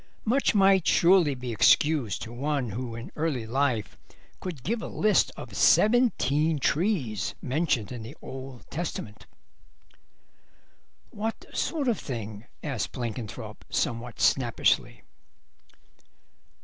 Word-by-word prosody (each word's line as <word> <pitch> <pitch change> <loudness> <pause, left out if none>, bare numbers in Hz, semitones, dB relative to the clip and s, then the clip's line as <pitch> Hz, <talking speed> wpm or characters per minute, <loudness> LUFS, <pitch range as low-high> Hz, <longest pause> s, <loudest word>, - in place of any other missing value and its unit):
Much 245 +1 +2
might 195 -3 +5
surely 170 -5 +5
be 125 -1 -5
excused 135 +1 +3
to 115 - -8
one 135 -2 -1
who 120 +2 -5
in 115 +1 -8
early 150 -7 -1
life 120 -2 -1 0.4
could 165 -9 -6
give 225 - -1
a - - -5
list 215 0 +2
of - - -9
seventeen 165 - +3
trees 140 - 0
mentioned 135 -5 0
in 120 -2 -6
the 110 - -9
Old 130 -1 -9
Testament. 150 -10 -5 1.8
"What 220 +2 -4
sort 300 -5 -1
of 235 -4 +1
thing?" 110 -4 -6 0.2
asked 135 -8 -3
Blenkinthrope, 120 -3 -6
somewhat 120 +1 -2
snappishly. 120 -4 +2
135 Hz, 110 wpm, -27 LUFS, 120-175 Hz, 1.8 s, might